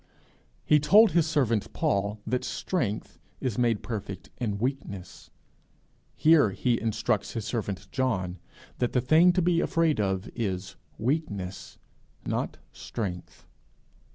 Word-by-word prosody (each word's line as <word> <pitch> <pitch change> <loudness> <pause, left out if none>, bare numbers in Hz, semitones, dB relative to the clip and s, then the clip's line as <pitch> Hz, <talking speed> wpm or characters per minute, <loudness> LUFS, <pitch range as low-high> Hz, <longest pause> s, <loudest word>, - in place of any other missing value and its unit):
He 150 - +5
told 210 +9 +6
his 170 -2 +3
servant 120 -9 +1
Paul 100 +1 0
that 125 +2 -1
strength 120 - -3 0.2
is 125 -5 -2
made 115 -3 +1
perfect 100 -5 -6
in 105 -5 -2
weakness; 100 -6 -4 0.9
here 155 -7 +5
he 115 +4 0
instructs 115 0 -1
his 115 -3 -4
servant 100 -5 -3
John 95 -9 -1 0.4
that 125 - 0
the 125 - +3
thing 160 +7 +6
to 180 -1 +2
be 170 -1 +3
afraid 165 -6 +1
of 95 0 0
is 95 -5 -3 0.2
weakness, 105 - -3 0.5
not - - -2
strength. 90 -6 -6
115 Hz, 125 wpm, -27 LUFS, 100-145 Hz, 0.9 s, told